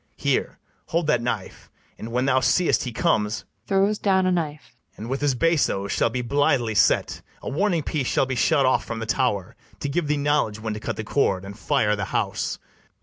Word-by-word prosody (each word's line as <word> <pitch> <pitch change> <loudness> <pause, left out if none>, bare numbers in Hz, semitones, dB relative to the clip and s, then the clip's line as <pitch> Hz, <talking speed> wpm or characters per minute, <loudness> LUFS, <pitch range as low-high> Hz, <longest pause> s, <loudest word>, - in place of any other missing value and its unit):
Here, - - 0 0.3
hold 170 0 0
that 150 - +2
knife; 120 +1 -4 0.3
and, 115 - -8
when 125 +2 0
thou 130 -1 +3
seest 175 +4 +2
he 125 - -3
comes, 110 -2 0 0.2
[Throws 200 +2 +2
down 190 -2 +2
a 185 - +2
knife.] 155 -6 -3 0.2
And 110 +3 -7
with 135 - -2
his 145 -3 +2
bassoes 125 - +1
shall - - +2
be 125 +2 -3
blithely 125 -3 +1
set, - - +2 0.2
A - - -3
warning 175 0 +1
piece 140 -4 -2
shall - - +2
be 130 - -3
shot 140 +2 +3
off 130 - +2
from 115 - -5
the 115 - -4
tower, 115 -6 -1 0.2
To 140 - -3
give 155 +2 -1
thee 150 0 +1
knowledge 145 -7 +1
when 110 0 -3
to 105 - -5
cut - - -4
the 110 - -4
cord, 100 -6 0
And 100 +1 -8
fire 110 -3 +1
the 100 -1 -3
house. - - -2
130 Hz, 205 wpm, -24 LUFS, 110-150 Hz, 0.3 s, thou